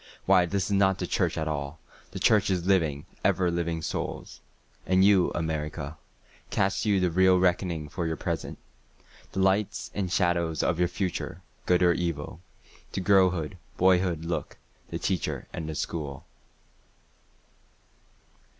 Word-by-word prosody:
Why 90 -2 +5
this 100 +1 -1
is - - -4
not 95 -1 +3
the - - -2
church - - 0
at 80 - -1
all—the 75 0 -7
Church 105 -3 +4
is 90 -2 0
living, 80 -7 +1 0.2
ever 90 -2 +2
living 85 -1 -2
Souls.")And 95 +4 -2
you, 100 -3 +5
America, 75 -2 -3 0.5
Cast 95 +1 0
you 100 -2 +3
the 90 -2 +1
real 95 +1 +5
reckoning 90 -3 0
for 85 +3 -3
your 80 - -1
present? - - -4 0.8
The 95 - 0
lights 95 +2 +1
and 95 -3 -2
shadows 85 -4 +1
of 85 - 0
your 90 - +3
future—good 90 0 -2
or 90 -1 +5
evil? 85 -1 -3 0.5
To - - -2
girlhood, 95 -3 +2 0.2
boyhood 90 -3 +3
look—the 85 - -6
Teacher - - -2
and 80 -1 -5
the 80 - -4
School. 75 -5 -4
90 Hz, 130 wpm, -27 LUFS, 80-95 Hz, 0.8 s, Why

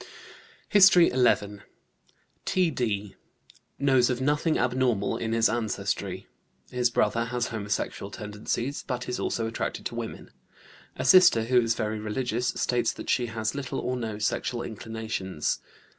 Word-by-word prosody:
HISTORY 190 -4 +7
XI. 105 -5 +2 0.8
T.D., 115 - 0 0.6
knows 135 -3 +3
of 125 -1 -1
nothing 150 +4 +1
abnormal 125 -4 +1
in 110 - -3
his 115 0 +4
ancestry. 110 -3 -2 0.5
His 125 -1 +2
brother 115 0 +1
has 120 0 -2
homosexual 105 -2 -3
tendencies, 105 +7 -4
but 125 -2 -4
is 125 - -3
also 115 - -1
attracted 115 - -4
to - - -3
women. - - -6 0.6
A - - -4
sister, 180 -12 +7
who 125 +2 +3
is 115 -1 0
very 110 0 -2
religious, 120 +3 -2
states 125 -1 0
that - - -4
she 120 -2 +1
has 110 -1 -2
little 140 -3 -4
or 125 - -2
no 110 -4 -4
sexual 120 +3 -1
inclinations. 110 -6 -3
120 Hz, 135 wpm, -27 LUFS, 110-125 Hz, 0.8 s, HISTORY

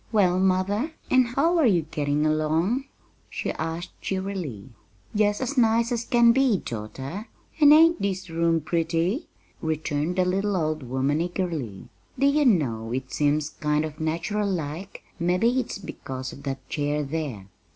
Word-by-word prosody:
"Well, 185 -5 +3
mother, 190 - +1 0.2
and 255 -1 +5
how 320 +8 +2
are 295 - +5
you 175 -7 +3
getting 150 -1 -1
along?" 160 - +1 0.4
she - - -3
asked 165 +2 -4
cheerily. 190 - -4 0.5
"Jest 210 +1 +2
as 265 +1 0
nice 230 0 +3
as 235 -1 -1
can 235 -2 +5
be, 260 -4 +3
daughter, 135 - -6 0.3
and 295 -2 +8
ain't 325 -3 +6
this 190 -1 -2
room 165 0 +1
pretty?" 170 - 0 0.3
returned 155 +1 -1
the 185 -1 +2
little 195 +2 0
old 155 -2 -1
woman 130 +4 0
eagerly. 165 - -3 0.3
"Do 275 - +2
you 290 +1 +3
know, 120 - +1
it 130 +1 -4
seems 150 +1 +1
kind 150 +1 0
of 150 -1 -8
natural 170 +6 -1
like; 170 +2 -4 0.2
mebbe 180 +3 +1
it's 245 -1 +1
because 130 -9 -7
of 140 - -11
that 135 -1 -5
chair 150 0 -1
there. 140 -9 -4
170 Hz, 150 wpm, -25 LUFS, 150-210 Hz, 0.5 s, and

